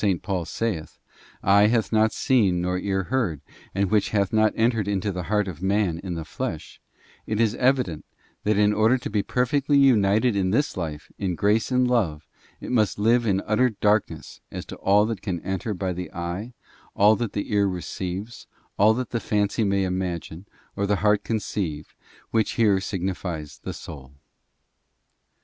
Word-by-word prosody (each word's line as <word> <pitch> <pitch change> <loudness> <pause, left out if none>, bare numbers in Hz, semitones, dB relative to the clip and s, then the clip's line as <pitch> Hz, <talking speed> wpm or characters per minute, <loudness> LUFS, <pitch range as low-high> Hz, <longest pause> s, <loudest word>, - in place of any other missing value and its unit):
Paul 90 -4 -2
saith, 100 -8 -3 0.5
eye 100 +2 +5
hath 115 0 +1
not 110 0 +3
seen 100 -9 +2
nor 90 +1 -1
ear 95 0 -1
heard, 100 - 0 0.4
and 100 -1 0
which 105 -2 +2
hath 100 -1 0
not 110 0 +4
entered 115 -3 +1
into 100 0 -1
the 90 -1 -4
heart 105 -1 +1
of 90 -4 -7
manin 95 -3 0
the 80 -1 -5
flesh, - - -6 0.5
it 110 0 -1
is 110 -2 +3
evident, 125 - +1 0.4
that 105 0 +1
in 105 0 +4
order 110 +4 +3
to 125 - -6
be 105 -1 +1
perfectly 135 +6 +1
united 110 -3 +4
in 95 -2 +1
this 135 +9 +1
life 80 -4 -5
in 95 -3 -1
grace 105 +4 +1
and 125 -1 +2
love, 90 -12 0 0.3
it - - -7
must 110 -5 +2
live 115 +3 +3
in 95 -1 +1
utter 115 +4 +3
darkness 105 -1 -1
as - - -6
to - - -8
all 100 +2 +3
that 110 -3 -4
can 90 -4 -3
enter 95 +3 -3
by 95 -2 -2
the 90 +1 -6
eye, 90 +8 -5 0.4
all 105 +2 +5
that 115 +1 -3
the 100 - -4
ear 100 -1 +3
receives, 95 +4 -5 0.3
all 110 +2 +5
that 125 0 -4
the 120 - -1
fancy 105 0 0
may 100 -1 +1
imagine, 90 -1 -4 0.3
or 100 -1 -1
the 105 - +2
heart 105 -1 +3
conceive, 95 -8 -3 0.4
which 110 -3 +1
here 105 -4 +3
signifies 90 -6 -4
the - - -6
soul. 70 -4 -10
100 Hz, 170 wpm, -24 LUFS, 95-110 Hz, 0.5 s, eye